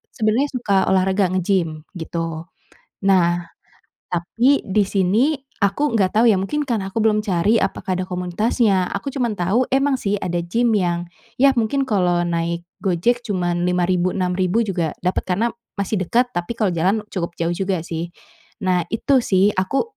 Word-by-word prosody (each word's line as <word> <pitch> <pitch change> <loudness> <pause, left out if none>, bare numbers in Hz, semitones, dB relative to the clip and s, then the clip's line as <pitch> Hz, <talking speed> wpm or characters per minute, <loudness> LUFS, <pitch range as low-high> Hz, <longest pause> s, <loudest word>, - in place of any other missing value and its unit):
sebenernya 225 +6 +1
suka 200 -6 +1
olahraga 190 +1 +2
nge-gym 170 -5 0 0.2
gitu. 165 0 -4 0.6
Nah. 175 -3 +3 0.6
Tapi 230 +11 +1
di 200 +1 +1
sini 210 - +2 0.2
aku 205 +8 +1
nggak 200 -4 +1
tahu 225 +2 +5
ya, 195 - +2
mungkin 295 +11 -1
karena 225 -8 -2
aku 215 +3 -2
belum 215 -1 +3
cari 200 +3 +2
apakah 185 -1 -2
ada 185 - -2
komunitasnya. 185 +2 +1
Aku 270 +7 -4
cuma 250 -3 -1
tahu 200 +8 +1
emang 270 0 +1
sih, 200 0 0
ada 175 -3 -2
gym 230 +8 0
yang, 175 -4 +1 0.3
ya 275 +2 +5
mungkin 255 +5 +1
kalau 180 -4 +2
naik 170 0 -2 0.2
Gojek 235 +7 0
cuma 180 -4 0
Rp5.000 180 0 +1
Rp6.000 185 +3 +1
juga 175 -7 -2
dapet 180 - 0
karena 210 +6 0 0.2
masih 200 0 -1
dekat. 245 +1 +2
Tapi 175 +4 -3
kalau 210 -5 +1
jalan 185 +6 +1
cukup 170 -3 -3
jauh 170 0 -1
juga 185 -1 -1
sih. 170 0 -4 0.6
Nah, 180 -2 +1
itu 265 +4 +3
sih 195 -2 +3
aku 190 - 0
190 Hz, 160 wpm, -21 LUFS, 175-225 Hz, 0.6 s, tahu